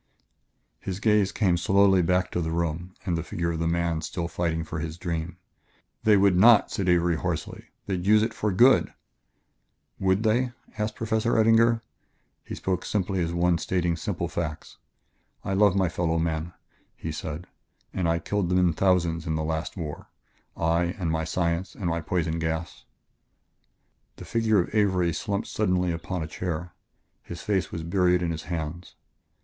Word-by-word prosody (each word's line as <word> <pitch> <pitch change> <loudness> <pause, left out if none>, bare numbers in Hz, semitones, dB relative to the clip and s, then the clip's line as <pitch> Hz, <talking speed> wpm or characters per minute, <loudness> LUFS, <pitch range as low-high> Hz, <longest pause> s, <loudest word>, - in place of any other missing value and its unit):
His 95 0 -5
gaze 105 -3 +3
came 90 -6 +2
slowly 95 +1 +4
back 90 +2 +1
to 90 - -1
the 80 - -2
room 85 +2 -3
and 90 -4 0
the 85 - -1
figure 85 +1 -2
of 80 - -3
the 85 - 0
man 85 -1 0
still 85 +1 -3
fighting 80 -1 -2
for 80 0 -5
his 80 +1 -5
dream. 85 -1 -4 0.7
"They 105 -2 +6
would 100 -1 +4
not," 110 +4 +6
said 95 -2 -1
Avery 85 -1 +3
hoarsely; - - -4 0.2
"they'd 95 -3 -2
use 105 +1 +6
it 115 0 -2
for 105 - -1
good." 125 +8 +4 1.0
"Would 95 +2 +2
they?" 120 +3 +1 0.2
asked 105 0 -2
Professor 110 +1 0
Eddinger. 115 +1 +4 0.6
He - - -7
spoke 95 -1 -2
simply 95 -2 -1
as 85 - -2
one 85 0 +2
stating 85 -2 0
simple 80 - -3
facts. 80 -2 -5 0.7
"I 95 - -1
love 100 -1 +4
my 95 -2 +2
fellow 85 0 -1
men," 80 +1 -2 0.4
he 80 - -5
said, 75 +2 -5 0.5
"and 90 -3 0
I 85 - +2
killed 90 +2 -2
them 90 - +2
in 90 -2 +3
thousands 85 -2 +1
in 80 - 0
the 80 - -1
last 80 +3 -3
war 75 -4 -6 0.5
I, 85 +2 +1
and 85 -5 -1
my 80 0 -1
science, 85 +3 -1
and 100 - -6
my 85 -1 0
poison 80 0 -1
gas." 80 +1 -4 1.3
The - - -10
figure 110 -3 +2
of 90 - -6
Avery 95 -5 +2
slumped 100 +6 -2
suddenly 90 -4 0
upon 85 +1 -4
a - - -5
chair; 85 0 -4 0.5
his 85 - -9
face 100 -3 0
was 80 - -5
buried 90 +1 +2
in 85 - 0
his 80 -1 -5
hands. 85 +1 -5
90 Hz, 170 wpm, -26 LUFS, 85-95 Hz, 1.3 s, They